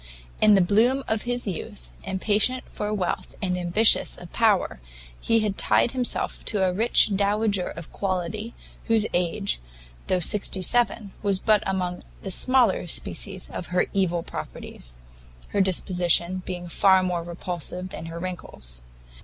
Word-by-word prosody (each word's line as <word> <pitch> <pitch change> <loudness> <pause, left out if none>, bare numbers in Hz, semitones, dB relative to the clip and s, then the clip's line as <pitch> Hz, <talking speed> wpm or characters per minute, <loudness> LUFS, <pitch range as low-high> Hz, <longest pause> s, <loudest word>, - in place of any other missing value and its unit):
In 210 -1 +7
the 195 - +5
bloom 230 +9 +3
of 220 -1 0
his 245 0 -2
youth, - - -6
impatient 210 +6 0
for 210 0 -4
wealth 195 -4 -2
and 185 -2 -1
ambitious 180 +5 +3
of 175 - -12
power, 215 - +2 0.4
he 230 -1 +2
had 210 -2 -2
tied - - +3
himself 255 -2 -2
to 200 -3 +1
a 180 - 0
rich 220 +1 +3
dowager 200 -1 +1
of 165 0 -9
quality, 195 +4 -3 0.3
whose 225 -2 +3
age, 180 +3 0 0.5
though 185 - +2
sixty 190 +1 +2
seven, 230 -1 +2
was 200 -2 +1
but 210 +1 +3
among 180 -2 -2 0.2
the 195 - -4
smaller 245 -4 +2
species 190 +3 -3
of 175 - -6
her 180 0 +1
evil 175 -4 +1
properties, - - -8 0.5
her 200 - +1
disposition 180 -1 +2
being 175 -1 -5
far 190 +2 +4
more 180 -2 -1
repulsive 175 +1 -3
than 165 - -7
her 165 0 -7
wrinkles. 170 - -5
190 Hz, 145 wpm, -25 LUFS, 180-215 Hz, 0.5 s, In